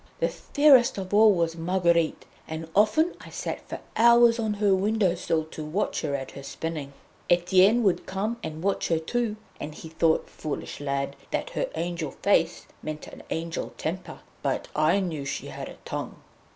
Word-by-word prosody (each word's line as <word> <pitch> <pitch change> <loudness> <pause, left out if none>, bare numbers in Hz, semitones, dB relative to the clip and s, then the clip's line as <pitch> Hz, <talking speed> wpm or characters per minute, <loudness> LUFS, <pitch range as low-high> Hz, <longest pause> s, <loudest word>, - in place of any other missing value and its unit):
The - - +2
fairest 285 -7 +4
of 190 0 -5
all 215 +1 +7
was 170 -3 0
Marguerite, 170 -1 +1 0.2
and 160 +1 -5
often 220 - +4
I - - -11
sat - - -5
for - - -5
hours 235 0 +6
on 215 -2 0
her 200 -1 +3
window 195 -1 +2
sill 165 -2 0
to 155 - -6
watch 160 +7 -1
her 145 -2 -1
at 135 -1 -5
her 140 - -9
spinning. 150 0 -5 0.4
Etienne 185 +6 +5
would 195 -4 +1
come 210 +5 -2
and 160 -4 -6
watch 200 0 0
her 165 - +2
too, 220 +7 -1 0.2
and 150 +1 -6
he 160 - -9
thought, 160 0 +2
foolish 155 -2 -6
lad, 140 -1 -2
that - - -2
her - - -2
angel 170 -3 -2
face 175 -4 +2 0.2
meant 155 0 -5
an - - -11
angel 165 +1 -4
temper; 180 +4 -5 0.2
but - - -2
I 155 +6 +3
knew 160 -6 -3
she 140 0 -4
had - - -6
a - - -11
tongue. - - -4
175 Hz, 180 wpm, -26 LUFS, 160-210 Hz, 0.4 s, all